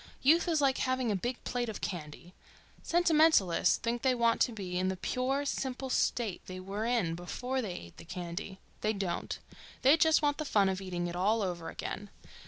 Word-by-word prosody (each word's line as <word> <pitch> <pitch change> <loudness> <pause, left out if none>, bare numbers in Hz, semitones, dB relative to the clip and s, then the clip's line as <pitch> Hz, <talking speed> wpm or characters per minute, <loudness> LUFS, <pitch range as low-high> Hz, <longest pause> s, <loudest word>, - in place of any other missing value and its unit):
Youth 325 +6 +5
is 320 -3 +2
like 270 -2 +2
having 255 -3 0
a - - +1
big 240 +6 -3
plate 245 -2 -2
of 215 - -5
candy. 170 -1 -6 0.5
Sentimentalists 315 - +4
think 235 0 -2
they 260 -2 +3
want 235 -1 +2
to 245 - +4
be 185 -5 -4
in 185 - +1
the 190 0 -1
pure, 265 +8 -1
simple 265 -1 -3
state 225 -8 0
they 185 0 -6
were 200 +4 -4
in 230 -9 +1
before 250 +10 -3
they 205 -7 -4
ate 85 - -10
the - - -10
candy. 180 +2 -6 0.2
They 215 +1 +1
don't. 195 -4 -3 0.5
They 275 +5 +7
just 320 0 +4
want 290 +1 +1
the - - 0
fun 200 -7 +3
of 190 0 -2
eating 180 -2 -3
it 175 0 -4
all 210 +5 +2
over 175 -3 -3
again. 205 0 -5
220 Hz, 195 wpm, -31 LUFS, 185-260 Hz, 0.5 s, They